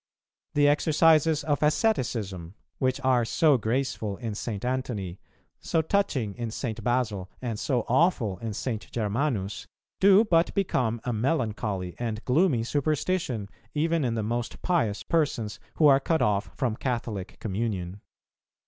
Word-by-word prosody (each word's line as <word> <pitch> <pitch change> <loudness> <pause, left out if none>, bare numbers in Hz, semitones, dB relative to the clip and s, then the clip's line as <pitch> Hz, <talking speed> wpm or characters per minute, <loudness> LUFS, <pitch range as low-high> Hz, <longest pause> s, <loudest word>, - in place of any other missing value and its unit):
The 145 0 +5
exercises 155 +1 +4
of 145 -2 0
asceticism, 115 - 0 0.2
which 130 0 +1
are 130 -3 +3
so 145 +3 +3
graceful 110 -3 -1
in 115 -3 -4
St. 105 0 -4
Antony, 120 -8 -3 0.4
so 160 - 0
touching 150 - 0
in 120 0 -4
St. 115 -1 -4
Basil, 110 -6 0
and 115 -4 -4
so 125 -5 0
awful 125 - +2
in 115 -3 -4
St. 115 -3 -4
Germanus, 105 -3 -2 0.3
do 200 +3 +6
but 165 -4 +2
become 125 - 0
a 125 - -2
melancholy 110 - -1
and 115 -2 -3
gloomy 135 -3 +3
superstition 145 - -1 0.3
even 165 +1 +1
in 120 -3 0
the 110 - -1
most 120 +2 -3
pious 130 - +1
persons 120 -10 -1 0.2
who 155 - +3
are 135 -2 +7
cut 160 +3 +1
off 100 0 +1
from 120 -5 -1
Catholic 115 -7 -3
communion. 100 -3 -3
120 Hz, 140 wpm, -27 LUFS, 105-150 Hz, 0.4 s, are